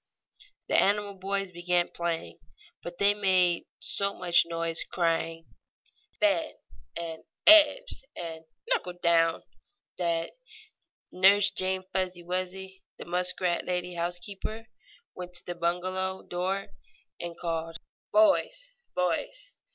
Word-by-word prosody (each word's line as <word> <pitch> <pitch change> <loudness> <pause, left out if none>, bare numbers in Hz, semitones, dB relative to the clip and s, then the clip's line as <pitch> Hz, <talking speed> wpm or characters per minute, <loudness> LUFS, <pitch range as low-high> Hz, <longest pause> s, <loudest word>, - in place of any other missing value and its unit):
The - - 0
animal 205 0 +1
boys 195 0 -3
began 175 0 0
playing, 165 - -4 0.4
but 175 0 -8
they 200 +2 +5
made 185 -4 +3
so 200 0 -1
much 175 -2 +3
noise, 165 -1 -1
crying 165 -1 -1 0.7
"Fen!" 315 0 +1 0.4
and 165 -1 -6 0.2
"Ebbs!" 320 +13 +7
and 160 -1 -7 0.2
"Knuckle 180 - 0
down!" 165 -1 +3 0.6
that 170 -2 -1 0.8
Nurse 195 +2 +5
Jane 185 0 -2
Fuzzy 185 -2 -2
Wuzzy, 185 +2 -5 0.2
the - - -9
muskrat 180 0 0
lady 180 0 -2
housekeeper, 180 +6 -4 0.5
went 180 0 -8
to 175 - -5
the 175 - -4
bungalow 185 +2 -2
door 185 +3 -3 0.5
and 170 -1 -6
called: 165 -1 -3 0.3
"Boys! - - +3 0.2
Boys! 180 - -2
180 Hz, 110 wpm, -28 LUFS, 170-195 Hz, 0.8 s, Ebbs